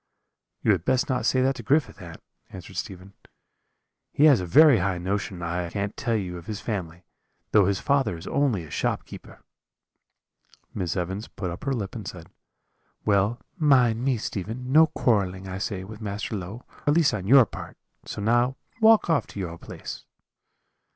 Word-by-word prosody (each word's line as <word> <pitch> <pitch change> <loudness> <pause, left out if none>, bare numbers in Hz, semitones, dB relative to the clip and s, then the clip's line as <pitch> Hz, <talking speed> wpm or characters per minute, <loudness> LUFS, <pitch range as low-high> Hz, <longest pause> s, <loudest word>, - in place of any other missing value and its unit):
"'You 110 - +4
had 95 -5 +1
best 130 +5 +1
not 125 -3 0
say 130 -1 +3
that 135 +1 +2
to - - -6
Griffith, 135 -2 0
aunt,' 85 -2 -11 0.3
answered 95 +1 -11
Stephen; 95 +1 -6 1.0
'he 145 - +1
has 140 -9 +6
a 90 - -4
very 145 - +7
high 95 0 0
notion, 95 0 -3
I 85 +1 -2
can 100 +2 -3
tell 120 -4 -2
you, 90 -4 -3
of 85 - -15
his 105 -1 -4
family, 90 -7 -5 0.5
though 105 -3 +5
his 100 -1 0
father 140 -11 +1
is 80 - -11
only 130 -11 0
a 75 - -12
shopkeeper.' - - -4 1.3
"Miss 90 0 -2
Evans 95 +4 -3
put 90 -4 -5
up 90 +10 -8
her 140 - 0
lip 105 -6 -4
and 110 -5 -7
said: 85 -3 -9 0.7
"'Well, 105 +3 +2 0.2
mind 125 -6 +4
me, 130 -2 +1
Stephen, 110 +5 -5
no 160 +3 +7
quarrelling, 95 -9 0
I 95 0 -5
say, 95 -1 -3
with 110 +3 -10
Master 105 +1 -4
Low, 100 +5 -7 0.2
at 145 - +4
least 165 -3 +4
on 95 -3 -4
your 130 +1 +8
part; - - -9 0.3
so - - -6
now 120 +4 +2 0.3
walk 220 0 +6
off 160 -8 +1
to - - -9
your 85 -3 -5
place.' - - -8
105 Hz, 180 wpm, -25 LUFS, 95-125 Hz, 1.3 s, your